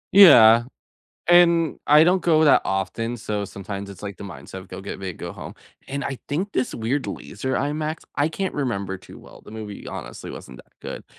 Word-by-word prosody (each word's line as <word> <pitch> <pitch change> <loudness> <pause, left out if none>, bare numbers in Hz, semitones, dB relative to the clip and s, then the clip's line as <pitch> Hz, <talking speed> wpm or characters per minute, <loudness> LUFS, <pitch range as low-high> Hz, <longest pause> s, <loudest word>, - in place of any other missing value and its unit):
Yeah, 120 - +9 0.6
and 170 -2 +5
I 150 +1 +7
don't 180 +3 +4
go 160 -2 +3
that 150 - +5
often. 95 +5 -2
So 105 -2 -3
sometimes 100 0 -7
it's 100 0 -11
like 100 -2 -6
the - - -9
mindset 95 -2 -10
of, 95 0 -8
"Go, 95 +1 -8
get 100 0 -7
big, 95 -2 -6
go - - -7
home." - - -9 0.3
And 140 +1 -4
I 135 -2 -4
think 180 +8 -2
this 130 - -1
weird 125 +5 -2
laser 130 0 -4
IMAX 155 +3 -2 0.2
I 145 +2 +2
can't 190 +4 -3
remember 100 -9 -3
too - - -14
well. - - -15
The - - -13
movie, 105 -2 -8
honestly, - - -8
wasn't 65 - -10
that - - -37
good. - - -7
120 Hz, 200 wpm, -23 LUFS, 100-155 Hz, 0.6 s, Yeah